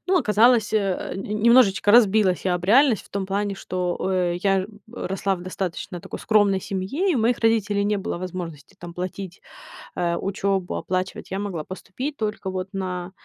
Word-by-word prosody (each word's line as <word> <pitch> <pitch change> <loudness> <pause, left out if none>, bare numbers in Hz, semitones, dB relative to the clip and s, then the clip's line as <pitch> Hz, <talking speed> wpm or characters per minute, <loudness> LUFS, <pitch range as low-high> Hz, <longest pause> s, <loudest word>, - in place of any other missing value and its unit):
ну, 370 0 +3
оказалось, 220 - +4
э, 215 - +4 0.4
н 190 - -4
немножечко 210 -2 +4
разбилась 210 -5 +4
я 180 -1 +2
об 175 0 -3
реальность 245 +2 +4
в - - -19
том 195 -1 -3
плане, 200 +1 -1
что, 180 -2 -3
э, 180 -2 +1
я 195 -1 +2 0.2
в 230 +2 -6
росла 195 0 0
в 175 - -10
достаточно 180 -1 -5
такой - - -8
скромной 205 -3 +3
семье, 200 - -2
и - - +2
у 255 - +1
моих 230 +2 +2
родителей 210 -3 +2
не 210 0 +1
было 180 - -4
возможности 175 -5 -7
там 175 -1 -9
платить, 185 +1 -6 0.6
э, 170 -1 0
учебу, 195 -1 -1
оплачивать. 185 +1 -3
Я 195 - -2
могла 190 -6 -4
поступить 250 - -6
только 210 -3 -3
вот 185 0 -4
на 180 -1 -4
195 Hz, 180 wpm, -23 LUFS, 185-215 Hz, 0.6 s, оказалось